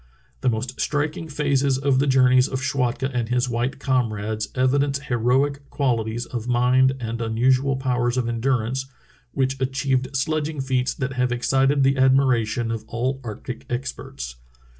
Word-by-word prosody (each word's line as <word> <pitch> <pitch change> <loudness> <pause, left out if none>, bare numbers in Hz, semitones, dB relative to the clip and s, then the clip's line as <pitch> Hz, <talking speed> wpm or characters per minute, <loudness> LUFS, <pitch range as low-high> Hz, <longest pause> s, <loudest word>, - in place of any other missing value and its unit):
The - - +1
most 120 +2 -3
striking 150 +2 -1
phases 140 -2 +1
of 135 -1 +2
the 140 - +2
journeys 130 -1 +5
of 130 - -3
Schwatka 130 -1 -1
and 120 -2 -1
his 125 +1 +1
white 120 +2 -1
comrades 110 -5 -1
evidence 140 +2 +2
heroic 140 +2 0
qualities 120 -3 -1
of 120 -1 -5
mind 125 +2 +3
and 115 0 -4
unusual 130 +4 +2
powers 125 -2 0
of 125 -2 0
endurance 125 +2 -1 0.5
which 135 0 -1
achieved 130 0 0
sledging 155 +2 -1
feats 130 -1 0
that 130 0 -3
have 125 -1 0
excited 135 +3 +2
the 135 0 +3
admiration 125 -4 +2
of 115 -1 -4
all 130 +4 -2
arctic 120 +2 -7
experts. 65 - -5
130 Hz, 145 wpm, -23 LUFS, 120-135 Hz, 0.5 s, journeys